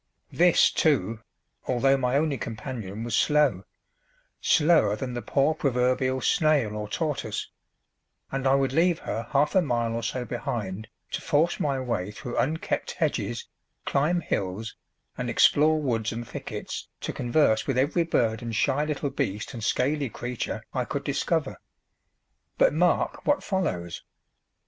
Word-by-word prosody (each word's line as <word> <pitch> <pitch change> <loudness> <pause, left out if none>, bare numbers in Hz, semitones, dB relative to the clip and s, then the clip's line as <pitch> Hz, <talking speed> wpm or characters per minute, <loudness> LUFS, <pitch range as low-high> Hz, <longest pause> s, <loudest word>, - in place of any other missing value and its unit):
This, - - +5
too, 110 +4 +1 0.5
although 135 +2 +3
my 125 0 +1
only 150 -1 +1
companion 110 -3 -5
was 115 -2 -1
slow 145 -11 +3 0.8
slower 150 -10 +4
than 125 +3 -5
the 120 - -3
poor 140 +5 +2
proverbial 130 -2 +1
snail 145 -8 +2
or 105 -1 -4
tortoise 150 +3 -3 0.8
and 135 0 -1
I 135 - +5
would 135 -1 +1
leave 170 +2 +3
her 115 +1 -4
half 145 +2 +2
a 190 - +5
mile 120 -6 0
or 115 - -2
so 125 +2 -3
behind 110 -4 -4 0.2
to - - -3
force 165 +2 +1
my 140 -2 0
way 115 -7 -2
through 120 +3 -5
unkept 160 +5 -1
hedges, - - -2 0.4
climb 160 +5 +1
hills, 100 - -3 0.4
and - - -2
explore 155 +2 +4
woods 115 -6 -1
and 115 0 -5
thickets - - -6
to - - -3
converse 120 -3 +2
with 135 -3 0
every 145 +6 +2
bird 115 -9 +1
and 115 -2 -4
shy 135 +6 +2
little 150 -2 -2
beast 105 +6 -3
and 115 -3 -6
scaly 140 +3 +1
creature 120 +1 -4
I - - 0
could - - -4
discover. - - -1 1.0
But - - +4
mark 175 +2 +1
what 290 0 +2
follows. 95 - -2
130 Hz, 145 wpm, -26 LUFS, 115-150 Hz, 1.0 s, This